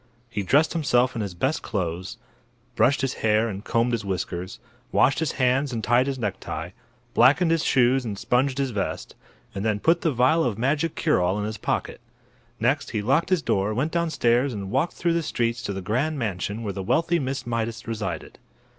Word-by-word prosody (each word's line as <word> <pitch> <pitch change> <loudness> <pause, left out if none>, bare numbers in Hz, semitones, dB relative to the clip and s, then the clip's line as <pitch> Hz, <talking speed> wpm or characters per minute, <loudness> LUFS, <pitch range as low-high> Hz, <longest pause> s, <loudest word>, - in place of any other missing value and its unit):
He 105 - -2
dressed 145 - +3
himself 130 -6 +2
in 115 - -2
his 100 -4 -4
best 135 - 0
clothes, 90 -3 -3 0.6
brushed 140 +2 +3
his 135 -1 0
hair 110 +1 +3
and 100 -2 -5
combed 115 +2 +1
his 115 -2 -1
whiskers, 90 -1 -4 0.3
washed 135 +4 +3
his 160 -2 -1
hands 130 +2 +1
and 115 -3 -3
tied 120 +5 +3
his 135 -1 -2
necktie, 95 -6 -4 0.4
blackened 145 +8 +5
his 165 -1 +2
shoes 130 0 +3
and 105 -4 -4
sponged 125 +5 +1
his 135 -2 0
vest, 100 -3 -3 0.4
and 95 - -4
then 110 -2 0
put 165 +8 +3
the 160 - +1
vial 130 +6 +3
of 115 -5 -1
magic 145 +6 0
cure 150 - +2
all 90 +3 +1
in 105 - -2
his 110 +1 -5
pocket. - - -2 0.6
Next - - +1
he 105 - -2
locked 135 +10 +2
his 185 -4 +2
door, 100 +2 0
went 145 +7 0
downstairs 140 -6 +1
and 100 -1 -5
walked 135 +7 +1
through 170 -1 0
the 170 - +1
streets 115 -6 -1
to 110 - -3
the 95 -1 -4
grand 135 +11 0
mansion 105 -1 -3
where 100 -3 -3
the 95 - -4
wealthy 165 - +1
Miss 135 -2 -3
Mydas 115 -1 -3
resided. 105 -6 -5
120 Hz, 200 wpm, -24 LUFS, 105-140 Hz, 0.6 s, blackened